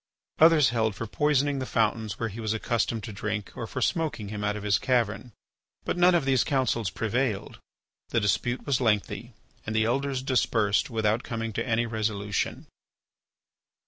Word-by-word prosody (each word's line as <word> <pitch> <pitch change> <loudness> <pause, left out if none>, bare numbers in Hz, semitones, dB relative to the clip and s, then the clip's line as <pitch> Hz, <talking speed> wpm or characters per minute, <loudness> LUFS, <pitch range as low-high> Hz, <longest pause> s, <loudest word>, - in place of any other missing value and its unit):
Others 160 -5 +6
held 110 -3 0
for 115 - -4
poisoning 145 +3 +1
the 130 - -3
fountains 110 -2 0
where 115 - -1
he 110 +3 -8
was 110 -1 -1
accustomed 115 0 -1
to 110 - -6
drink 105 +1 -4
or 115 - -5
for 130 - -5
smoking 150 -11 -1
him 105 0 -5
out 105 0 0
of 105 - -6
his 105 -1 +2
cavern. 120 -2 0 0.5
But - - -1
none 175 0 +5
of 165 -5 +1
these 135 -2 +3
counsels 125 - 0
prevailed. 110 +3 -2 0.5
The - - +2
dispute 120 +4 0
was 135 -3 +1
lengthy 115 +1 0 0.3
and 110 - -4
the 110 0 +3
Elders 135 +2 -1
dispersed 115 -6 +1
without 110 -1 +1
coming 115 -2 -4
to 115 - -1
any 115 0 +1
resolution. 105 -3 -2
115 Hz, 170 wpm, -27 LUFS, 105-130 Hz, 0.5 s, Others